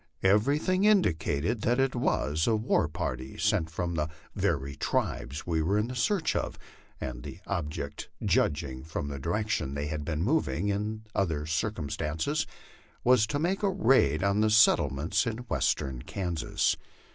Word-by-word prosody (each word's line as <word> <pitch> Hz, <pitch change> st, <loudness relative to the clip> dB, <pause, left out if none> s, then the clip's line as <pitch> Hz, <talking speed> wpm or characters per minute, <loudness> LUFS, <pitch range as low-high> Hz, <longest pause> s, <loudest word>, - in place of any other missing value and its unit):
Everything 140 Hz, -, +3 dB
indicated 95 Hz, -, +2 dB
that 120 Hz, +4 st, +2 dB
it 135 Hz, 0 st, +2 dB
was 80 Hz, -9 st, +1 dB
a 115 Hz, -, +4 dB
war 110 Hz, -7 st, +2 dB
party 70 Hz, -6 st, -4 dB
sent 80 Hz, -, +1 dB
from 85 Hz, +2 st, -3 dB
the 75 Hz, -1 st, -1 dB, 0.2 s
very 70 Hz, +1 st, -1 dB
tribes 70 Hz, +2 st, -2 dB
we 80 Hz, -2 st, 0 dB
were 95 Hz, +6 st, +1 dB
in 115 Hz, +4 st, -1 dB
search 160 Hz, -, +1 dB
of, -, -, -2 dB, 0.4 s
and -, -, -5 dB
the -, -, -8 dB
object, 75 Hz, -3 st, -4 dB, 0.2 s
judging 70 Hz, -4 st, +1 dB
from 80 Hz, -2 st, -4 dB
the 70 Hz, -1 st, -5 dB
direc 105 Hz, +9 st, -1 dB
tion 70 Hz, -10 st, -1 dB
they 70 Hz, +1 st, -2 dB
had 75 Hz, 0 st, -3 dB
been 80 Hz, +1 st, -2 dB
moving, 105 Hz, -, +1 dB
and 110 Hz, +2 st, -3 dB
other 80 Hz, -6 st, 0 dB
circumstances, 80 Hz, -2 st, -1 dB, 0.6 s
was 120 Hz, -3 st, +5 dB
to 125 Hz, -, -1 dB
make 175 Hz, +6 st, 0 dB
a 200 Hz, -, +2 dB
raid 130 Hz, -, +3 dB
on 100 Hz, +1 st, +2 dB
the 110 Hz, -, +3 dB
settlements 95 Hz, -, +4 dB
in 110 Hz, -1 st, -2 dB
Western 65 Hz, -, -1 dB
Kansas. 90 Hz, -2 st, -1 dB
90 Hz, 155 wpm, -29 LUFS, 75-110 Hz, 0.6 s, was